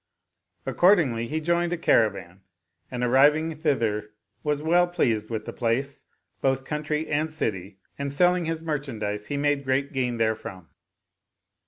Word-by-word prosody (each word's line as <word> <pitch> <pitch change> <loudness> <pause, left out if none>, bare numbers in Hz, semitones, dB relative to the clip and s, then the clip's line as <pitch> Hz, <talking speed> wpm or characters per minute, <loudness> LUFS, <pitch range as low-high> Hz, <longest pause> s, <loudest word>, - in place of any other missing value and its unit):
Accordingly 150 - +3
he 155 +4 -2
joined 170 +2 0
a 175 - -1
caravan 100 - +1 0.5
and 125 -1 -3
arriving 150 +6 +4
thither 115 -9 0 0.3
was 150 -1 0
well 175 +2 +4
pleased 115 -12 0
with 110 -2 -4
the - - -6
place, 130 +4 -2 0.4
both 135 0 +1
country 150 +1 -2
and 155 +2 -1
city; 100 - -3 0.2
and 140 0 -2
selling 180 +4 +3
his 165 0 -3
merchandise 115 -10 -3
he 145 - -2
made 145 -1 +1
great 135 +2 0
gain 125 -3 -1
therefrom. 110 -6 -2
140 Hz, 140 wpm, -25 LUFS, 115-155 Hz, 0.5 s, arriving